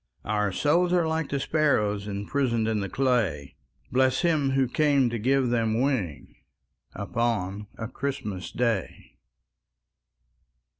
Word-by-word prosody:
Our 105 -2 0
souls 170 - +2
are 175 -2 +3
like 160 -1 -1
the 140 - -1
sparrows 105 -10 +1
Imprisoned 115 +3 -1
in 110 -1 0
the 100 -1 -3
clay, 110 - 0 0.4
Bless 130 0 +2
Him 155 -5 +2
who 135 -1 +2
came 140 -2 +2
to 115 - -2
give 130 +2 +2
them 115 -1 +1
wings 120 - -2 0.6
Upon 105 -4 -2
a 115 - -4
Christmas 115 -9 -4
Day! 115 -6 -2
120 Hz, 120 wpm, -26 LUFS, 105-140 Hz, 0.6 s, are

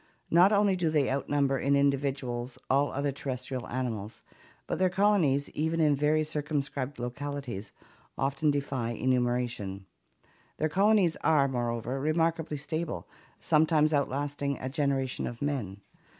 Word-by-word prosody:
Not 180 +4 +6
only 200 -2 +3
do 175 -3 0
they 150 -4 +2
outnumber 140 0 +1
in 140 +1 +2
individuals 135 -3 0
all 140 +2 +3
other 140 +1 -1
terrestrial 130 -2 -5
animals, 115 -4 -4 0.4
but - - -3
their 185 0 +3
colonies 180 -8 +2
even 160 +2 -1
in 150 -2 +4
very 150 +2 +2
circumscribed 145 -3 -3
localities 125 -4 -5 0.5
often 140 +2 +1
defy 135 -5 -1
enumeration. 120 -6 -1 0.7
Their 155 - 0
colonies 195 -1 +3
are, 150 -4 +3
moreover, 120 0 -2
remarkably 160 +1 0
stable, 150 - -4 0.3
sometimes 155 0 +3
outlasting 140 0 -1
a 130 - -4
generation 135 -2 -1
of 120 - -7
men. 120 -9 -3
140 Hz, 125 wpm, -29 LUFS, 130-155 Hz, 0.7 s, Not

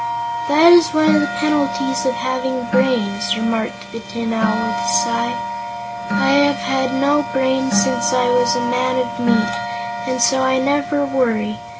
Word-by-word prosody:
"That 315 +3 +6
is 320 -2 +4
one 310 0 +4
of 295 - +4
the 290 - 0
penalties 240 -5 0
of 250 - 0
having 250 +1 -3
brains," 235 -2 0
remarked 230 -1 -3
the 230 - -7
Tin 230 0 -5
Owl 225 0 +1
with 235 0 -2
a 235 0 -3 0.2
sigh. 235 0 -2 0.7
"I 235 0 +1
have 285 0 +2
had 260 -2 -2
no 290 +2 +2
brains 260 -4 +1
since 120 0 0
I 245 -1 +1
was 240 -1 +2
a 235 0 -1
man 245 +1 0
of 235 -1 -3
meat, 235 0 +1 0.5
and 250 0 -2
so 235 +3 +3
I 260 0 +2
never 285 +3 0
worry. 225 -5 -1
240 Hz, 170 wpm, -18 LUFS, 235-265 Hz, 0.7 s, That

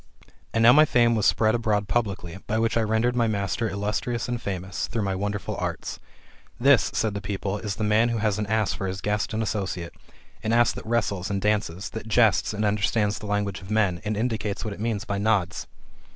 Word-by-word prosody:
And 115 - +1
now 120 +2 +9
my 155 - +7
fame 120 -5 +3
was 110 -3 +2
spread 110 -1 +3
abroad 105 -3 0
publicly, 100 -6 -2
by 110 - 0
which 115 0 +1
I 115 - +3
rendered 110 +3 +1
my 120 -2 +2
master 105 +2 -1
illustrious 105 +4 -2
and 120 -1 -3
famous, 95 -2 -3
through 110 0 -2
my 95 -1 -1
wonder 105 +2 -2
ful - - -5
arts. - - -4 0.6
This, 130 -5 +5
said 110 -2 0
the 100 - -4
people, 100 +1 -3
is 105 -2 -3
the 110 - -3
man 110 +3 +3
who 115 - -1
has 105 -1 0
an 105 - -2
ass 110 -2 +1
for 95 - -4
his 95 +1 -4
guest 105 +1 -1
and 110 +1 -1
associate; 95 -5 -3 0.5
an 110 - -1
ass 120 0 +4
that - - -9
wrestles 110 -4 0
and 100 -1 -1
dances, 100 -3 -1
that 110 0 -7
jests, 110 -4 +3
and 105 0 -1
understands 105 0 +1
the 105 - -8
language 100 -1 -1
of 95 - -11
men, 100 -5 +1
and 105 0 -2
indicates 110 -2 -2
what 105 - -3
it - - -11
means 110 -1 -2
by 100 -1 -2
nods. 100 -4 0
105 Hz, 220 wpm, -25 LUFS, 100-115 Hz, 0.6 s, now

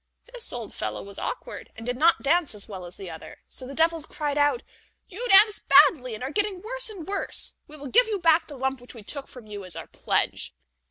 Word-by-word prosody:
This - - +3
old 235 -4 -4
fellow 105 -1 -3
was 200 0 -4
awkward, - - -6
and 225 - -9
did 245 0 -2
not 330 +6 +3
dance 310 -3 +3
as 205 - -4
well 190 -4 -8
as 175 - -12
the 190 -3 -8
other, 160 - -11
so 255 - -6
the 275 - -8
devils 325 0 +1
cried 295 -3 -3
out: 290 -4 +2 0.4
"You 460 +6 -5
dance 415 +2 +7
badly, 275 -4 +5
and 215 - -8
are 265 - -3
getting 410 0 0
worse - - -3
and 375 -7 -9
worse; 400 0 -2
we 305 - -12
will 285 - -10
give 460 - +4
you 430 -2 -1
back 330 -2 +3
the 290 - -10
lump 265 0 -2
which 245 - -14
we 225 - -11
took 275 +6 -6
from 250 -3 -12
you 205 -2 -8
as 180 -3 -7
a 165 - -7
pledge." - - -1
285 Hz, 235 wpm, -25 LUFS, 230-355 Hz, 0.4 s, dance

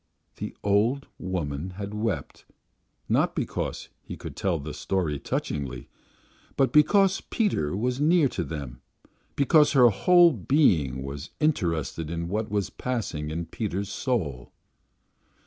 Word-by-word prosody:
The - - -6
old 110 +7 +2
woman 90 -1 -4
had 100 0 -5
wept, 105 -9 -3 0.6
not - - +1
because - - -3
he - - -8
could - - -8
tell 95 -3 0
the 75 0 -6
story 85 -7 -1
touchingly, 65 -5 -4 0.7
but 135 - +2
because 195 +5 +4
Peter 95 - -1
was 125 +5 -1
near 160 0 +4
to 90 - -3
her, 70 -5 -6 0.6
because 150 +2 +4
her 125 -4 +7
whole 175 - +5
being 85 - +2
was 70 +1 -6
interested 85 - 0
in 85 0 -3
what 105 +3 -2
was 100 -2 -1
passing 110 -12 -3
in 85 +2 -3
Peter's 100 +2 -3
soul. 100 - -2
100 Hz, 130 wpm, -26 LUFS, 75-130 Hz, 0.7 s, her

